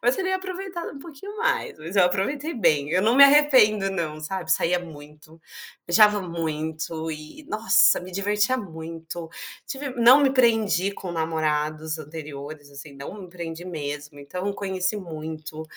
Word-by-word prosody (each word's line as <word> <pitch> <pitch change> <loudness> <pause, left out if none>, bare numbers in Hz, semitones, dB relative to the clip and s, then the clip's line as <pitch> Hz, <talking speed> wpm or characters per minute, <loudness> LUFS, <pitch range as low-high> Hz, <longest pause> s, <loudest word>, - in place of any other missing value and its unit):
mas 245 +2 +3
teria 375 0 0
aproveitado 375 -2 -6
um 280 - -10
pouquinho 345 +8 -10
mais, 465 - -1
mas 165 +6 -7
eu 190 - +7
aproveitei 275 - -1
bem. 150 - +2
Eu 185 +3 +2
não 225 +3 +3
me 280 - +8
arrependo 255 -9 +5
não, 160 -5 -3
sabe, 175 +1 -4
saía 175 +2 +2
muito, 155 -1 -13 0.5
viajava 210 +4 +5
muito 160 -1 -4
e, 155 - -9
nossa, 220 +2 +4
me 185 +1 -9
divertia 205 +6 +1
muito. 165 -4 -7 0.4
Tive 275 +1 -5
não 245 +1 +7
me 275 - +4
prendi 220 -7 +3
com 185 -3 -7
namorados 155 -1 -1
anteriores, 150 -1 -8
assim, 140 0 -11
não 140 +9 -8
me 185 - -10
prendi 170 -1 -7
mesmo. 145 -3 -6
Então 180 +8 -4
conheci 190 0 -2
muito, 160 -3 -7
175 Hz, 150 wpm, -24 LUFS, 155-220 Hz, 0.5 s, me